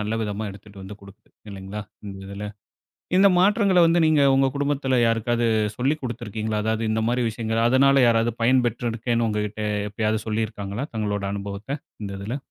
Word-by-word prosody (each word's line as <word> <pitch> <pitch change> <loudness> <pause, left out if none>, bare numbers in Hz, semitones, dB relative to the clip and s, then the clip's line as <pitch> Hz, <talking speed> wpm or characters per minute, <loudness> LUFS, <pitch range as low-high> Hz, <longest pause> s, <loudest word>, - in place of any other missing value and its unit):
நல்ல 105 +1 -2
விதமா 105 +1 -3
எடுத்துட்டு 100 0 -13
வந்து 100 +2 -9
கொடுக்குது 100 +2 -17 0.2
இல்லைங்களா? 100 +2 -7 0.2
இந்த 95 -1 -8
இதில. 100 +1 -6 0.7
இந்த 195 +1 +7
மாற்றங்கள 200 -1 +4
வந்து 170 +1 +3
நீங்க 155 -2 +4
உங்க 135 0 +3
குடும்பத்தில 140 -2 0
யாருக்காவது 115 +1 +1 0.3
சொல்லி 135 +5 +1
கொடுத்துருக்கீங்களா? 110 -3 -3
அதாவது 110 +1 -1
இந்த 110 0 0
மாதிரி 125 +1 +1
விஷயங்கள. 115 0 -2
அதனால 135 +1 +5
"யாராவது 115 0 +2
பயன்பெற்றிருக்கேன்னு, 120 -1 +1
உங்ககிட்ட 105 0 -3 0.3
எப்பயாவது 110 +1 -1
சொல்லியிருக்காங்களா? 110 +2 -3
தங்களோட 105 -2 -2
அனுபவத்த. 100 +7 -5 0.2
இந்த 100 - -5
இதில?" 110 +8 -4
110 Hz, 150 wpm, -23 LUFS, 105-130 Hz, 0.7 s, இந்த